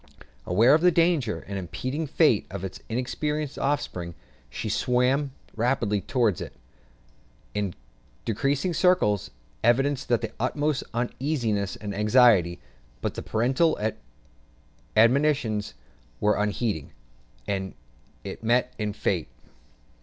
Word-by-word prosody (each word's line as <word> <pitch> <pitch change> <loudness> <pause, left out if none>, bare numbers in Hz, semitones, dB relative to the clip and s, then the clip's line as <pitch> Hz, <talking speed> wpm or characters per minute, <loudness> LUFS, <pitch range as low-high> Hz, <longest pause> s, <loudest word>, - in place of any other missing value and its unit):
Aware 115 +9 +5
of 155 - +4
the 180 - +6
danger 165 -9 +1
and 100 0 -3
impending 130 - -4
fate 150 -7 +3
of 95 0 -6
its 95 - -6
inexperienced 145 +5 -2
offspring, 90 - -2 0.3
she 85 - -5
swam 125 +5 +1 0.2
rapidly 115 -4 0
round 115 - +2
it, - - -6 1.0
in 100 -4 -2 0.5
decreasing 140 - 0
circles, 160 - +2 0.3
evincing 135 +3 +2
the - - -5
utmost 145 +4 0
uneasiness 120 -5 -1
and 105 -1 -6
anxiety; 105 -4 +4 0.4
but - - -2
the - - -5
parental 130 +9 +1 1.2
admonitions 115 -3 +3 0.4
were 105 - +3
unheeded, 105 - -1 0.6
and 95 -1 -3 0.5
it - - -7
met 125 +2 +2
its 105 -1 -2
fate. - - 0
120 Hz, 110 wpm, -26 LUFS, 105-140 Hz, 1.2 s, the